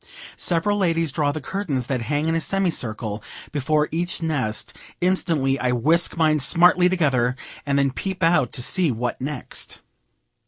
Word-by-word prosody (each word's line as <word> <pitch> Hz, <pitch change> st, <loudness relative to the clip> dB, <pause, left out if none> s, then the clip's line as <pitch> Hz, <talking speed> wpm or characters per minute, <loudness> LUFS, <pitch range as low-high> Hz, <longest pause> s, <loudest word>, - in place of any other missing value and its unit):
Several 195 Hz, +4 st, +1 dB
ladies 165 Hz, -4 st, +1 dB
draw 145 Hz, 0 st, +1 dB
the 155 Hz, -, -4 dB
curtains 150 Hz, -7 st, -3 dB
that 130 Hz, -1 st, -2 dB
hang 145 Hz, +6 st, -1 dB
in 165 Hz, -, +1 dB
a 165 Hz, -, 0 dB
semi 195 Hz, +1 st, +1 dB
circle 110 Hz, -5 st, -3 dB, 0.3 s
before 150 Hz, +1 st, +1 dB
each 175 Hz, +3 st, -2 dB
nest 130 Hz, -6 st, -2 dB, 0.2 s
instantly 165 Hz, -7 st, +1 dB
I 125 Hz, 0 st, +1 dB
whisk 160 Hz, +10 st, +2 dB
mine 155 Hz, -2 st, +3 dB
smartly 180 Hz, +4 st, +5 dB
together, 135 Hz, -9 st, +1 dB, 0.3 s
and 140 Hz, 0 st, +1 dB
then 140 Hz, -1 st, +2 dB
peep 190 Hz, +6 st, -4 dB
out 165 Hz, -8 st, +3 dB
to 125 Hz, -, -3 dB
see 180 Hz, +4 st, +1 dB
what 120 Hz, +2 st, -3 dB
next. 140 Hz, -1 st, -4 dB
150 Hz, 160 wpm, -23 LUFS, 130-170 Hz, 0.3 s, smartly